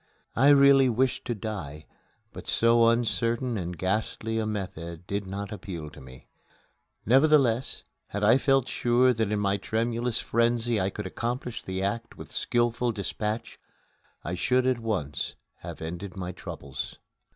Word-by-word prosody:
I 135 +4 +4
really 140 -2 +7
wished 125 +2 0
to 120 - -2
die, 90 -9 -6 0.5
but - - -9
so 115 0 +4
uncertain 115 +1 +1
and 90 -3 -4
ghastly 110 +4 -1
a 110 - -1
method 85 -5 -5
did 100 +1 -3
not 100 +2 -5
appeal 85 -7 -6
to - - -13
me. 65 0 -13 0.8
Nevertheless, 135 -1 +4 0.2
had 105 +1 -4
I 115 +5 +6
felt 135 -2 +3
sure 125 +1 +3
that 110 -3 -1
in 105 - +1
my 100 -1 +1
tremulous 115 +3 -1
frenzy 115 -1 +1
I 95 - +1
could 105 +1 -6
accomplish 120 +4 -3
the 95 0 -3
act 115 +4 -3
with - - -10
skilful 120 0 +1
dispatch, 105 +2 -3 0.6
I 85 - -3
should 125 +7 +2
at 130 -2 +2
once 95 - -3 0.2
have - - -8
ended 90 +4 -6
my 90 -1 -4
troubles. 70 -6 -7
110 Hz, 150 wpm, -27 LUFS, 95-120 Hz, 0.8 s, really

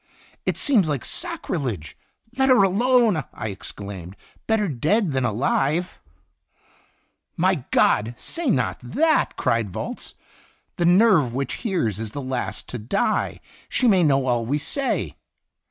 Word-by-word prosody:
"It - - 0
seems 220 - +3
like 140 -4 -2
sacrilege! 145 - -3 0.4
Let 265 0 +2
her 250 -6 +6
alone!" 220 - +3
I 110 - -4
exclaimed. 100 -2 -8 0.2
" - - -34
Better 220 -2 +2
dead 160 - +1
than 130 -1 0
alive 135 - 0 0.7
!" - - -38
"My - - +1
God! 110 +3 +2
say 335 -4 -1
not 125 - 0
that!" 305 - +1
cried 115 -3 0
Volz; - - -6 0.6
"the 175 - +1
Sin 175 - +6
Itinerant 205 -8 +5
nerve 120 - -7
which 140 +1 -2
hears 165 - -1
is 110 -1 -6
last 130 -3 -4
to 125 - -5
die. 120 - -1 0.3
She 255 - +1
may 195 -5 +5
know 140 -4 +3
all 120 -2 +1
we 135 +6 0
say." 270 - -2
150 Hz, 145 wpm, -23 LUFS, -, 0.7 s, her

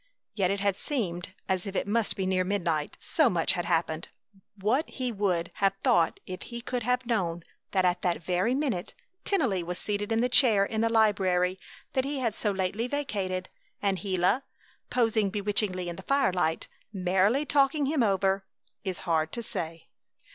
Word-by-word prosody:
Yet 190 -4 +1
it 200 0 -1
had 200 -1 +2
seemed 185 - -3
as 190 +1 -1
if 195 - -5
it - - 0
must 225 +1 0
be 190 - -2
near 185 0 +2
midnight, 170 -6 -1
so 310 -6 +3
much 170 -6 +1
had 175 -2 -2
happened. 160 0 0 0.5
What 220 +10 0
he 255 -2 -3
would 185 -5 0
have 195 -1 +2
thought 165 -2 +3
if 185 0 -7
he 235 -1 -6
could 245 +1 -3
have 250 +2 0
known 175 -8 -1 0.3
that 185 -2 +2
at 180 0 +2
that 175 -1 0
very 185 +8 +1
minute 265 -11 -2 0.3
Tennelly 250 - +1
was 175 +1 -4
seated 205 +2 -2
in 225 - +2
the 245 - +3
chair 230 -6 +5
in 220 +1 -2
the 230 - +2
library 190 -5 +2 0.3
that 260 - +2
he 280 +1 -2
had 235 -5 0
so 210 - -1
lately 195 +4 -1
vacated, 200 -10 -2 0.3
and 195 -2 0
Gila, 190 +5 +1 0.5
posing 225 -4 +2
bewitchingly 200 -2 -1
in 170 -1 -5
the - - -7
firelight, 185 - +1 0.2
merrily 195 +8 +2
talking 285 0 +3
him 290 0 +1
over, 195 -2 +2 0.4
is 190 -3 -3
hard 160 -2 0
to 235 - -3
say. 165 -7 -5
195 Hz, 175 wpm, -28 LUFS, 180-235 Hz, 0.5 s, chair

